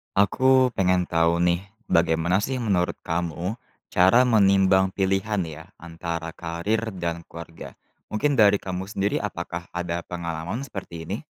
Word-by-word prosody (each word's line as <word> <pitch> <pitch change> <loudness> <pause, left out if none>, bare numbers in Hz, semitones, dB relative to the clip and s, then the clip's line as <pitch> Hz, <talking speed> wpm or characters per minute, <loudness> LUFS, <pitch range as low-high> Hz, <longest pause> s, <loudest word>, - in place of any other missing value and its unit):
Aku 130 +5 +4
pengen 90 -3 +2
tahu 85 0 +1
nih, 90 +2 +1 0.2
bagaimana 85 +2 +3
sih 130 +6 -2
menurut 95 -6 +1
kamu 85 +6 -3 0.3
cara 95 +8 +5
menimbang 95 -5 +4
pilihan 95 +1 0
ya 80 -1 -8
antara 85 0 -5
karir 95 +7 -2
dan 85 -2 -4
keluarga. 85 0 -10 0.3
Mungkin 135 +5 0
dari 105 -1 +6
kamu 95 -1 -4
sendiri 100 0 -1
apakah 85 +1 -5
ada 85 -1 -2
pengalaman 85 +6 -4
seperti 95 -9 -7
ini? 95 +6 -4
90 Hz, 135 wpm, -24 LUFS, 85-100 Hz, 0.3 s, dari